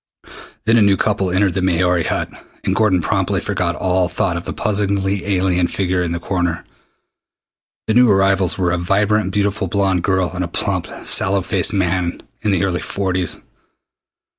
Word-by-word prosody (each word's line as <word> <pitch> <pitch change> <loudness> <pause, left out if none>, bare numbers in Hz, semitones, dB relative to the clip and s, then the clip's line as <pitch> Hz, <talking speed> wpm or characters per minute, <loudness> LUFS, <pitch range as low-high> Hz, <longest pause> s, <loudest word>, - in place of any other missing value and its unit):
Then 115 +1 +4
a - - +5
new 100 -1 +4
couple 100 -3 0
entered 95 +1 +1
the 95 - -1
Maori 90 -1 +1
Hut, - - -1 0.4
and - - 0
Gordon 100 -5 +2
promptly - - 0
forgot 85 -1 -2
all 90 0 +1
thought 90 0 -1
of 85 - -5
the - - -4
puzzlingly 100 -2 -1
alien 90 -2 +1
figure 90 0 -1
in 85 -1 -2
the 85 - -2
corner. 85 -2 -2 1.2
The 110 - 0
new 125 +1 +5
arrivals 95 -2 +2
were 90 -2 +1
a 90 - 0
vibrantly 100 +3 +1
beautiful 100 0 -1
blond 95 -1 +1
girl 95 -1 0
and 90 0 -2
a - - -2
plump, 85 - -2 0.2
sallow 95 0 +2
faced 95 +1 +2
man 90 -2 -1 0.2
in 105 - -1
the 95 -2 +1
early 90 -3 -1
forties. 95 -3 -2
95 Hz, 170 wpm, -18 LUFS, 90-100 Hz, 1.2 s, a